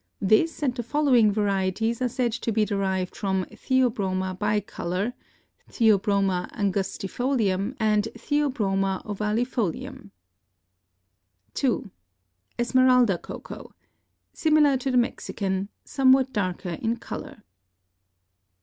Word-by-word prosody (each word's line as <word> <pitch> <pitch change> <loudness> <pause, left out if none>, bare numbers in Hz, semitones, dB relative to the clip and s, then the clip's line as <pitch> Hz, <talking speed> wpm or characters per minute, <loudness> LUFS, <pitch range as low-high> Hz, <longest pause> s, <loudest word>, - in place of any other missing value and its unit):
This 215 +12 +2
and 260 -4 +1
the 245 - -4
following 245 -4 +3
varieties 205 +3 0
are 250 - +1
said 245 -1 0
to 230 0 -3
be 215 0 +2
derived 190 -3 -1
from 190 -2 -1
Theobroma 200 -8 0
bicolor, 205 0 -2 0.6
Th. 225 -2 +4
angustifolium 200 +3 -1
and 215 -1 +2
Th. 235 +6 -2
ovalifolium. 205 - -2 1.4
2. 250 -5 -1 0.7
Esmeralda 250 -5 +4
Cocoa.—Similar 305 -3 -2
to 265 +1 -3
the 255 - +2
Mexican; 200 -5 -1 0.2
somewhat 260 -1 +3
darker 185 -4 -2
in 230 +1 0
color. 220 -1 -8
215 Hz, 90 wpm, -25 LUFS, 195-250 Hz, 1.4 s, Th